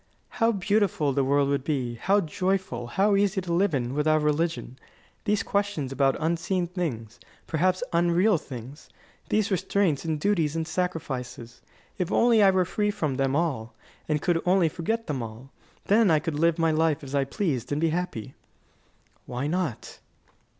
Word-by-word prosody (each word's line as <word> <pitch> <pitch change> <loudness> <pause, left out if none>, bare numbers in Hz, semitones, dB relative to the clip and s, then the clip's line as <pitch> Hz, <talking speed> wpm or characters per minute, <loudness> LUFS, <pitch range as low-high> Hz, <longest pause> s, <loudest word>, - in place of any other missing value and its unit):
"How 230 -2 +2
beautiful 200 -7 +1
the 140 0 +1
world 140 +1 +2
would 140 -1 0
be, 130 -5 -1
how 195 - +2
joyful, 180 -7 -2
how 200 - +2
easy 200 0 +2
to 175 -2 -3
live 180 -2 +2
in, 125 -1 -2
without 155 +1 +2
religion! 150 -3 -1 0.5
These 210 -1 +1
questions 200 -10 -1
about 135 0 +2
unseen 170 +3 0
things, 150 - -4 0.3
perhaps 185 +5 +1
about 170 -9 0
unreal 175 +2 +3
things, 130 +3 -10 0.4
these 215 -1 +1
restraints 185 -4 +1
and 160 -2 -2
duties 165 -5 +1
and 160 -1 -2
sacrifices 130 -10 -4 0.4
if 180 0 -1
I - - +1
were - - +4
only 205 -6 +5
free 210 +3 -1
from 150 -9 -2
them 135 0 +1
all, 135 -9 -1 0.3
and 150 -1 +1
could 170 -2 +1
only 180 -2 +3
forget 220 +8 -2
them 140 -4 -3
all, 115 +4 -9 0.3
then 215 0 +4
I 160 - +5
could 150 0 -3
live 165 0 +3
my 165 -1 +2
life 155 -1 +1
as 135 0 -8
I 140 -1 +2
pleased, 140 - -2
and 145 - 0
be 165 +1 +2
happy." 155 -8 -3 0.9
"Why 125 +2 -3
not?" 160 -6 -3
165 Hz, 170 wpm, -26 LUFS, 140-185 Hz, 0.9 s, only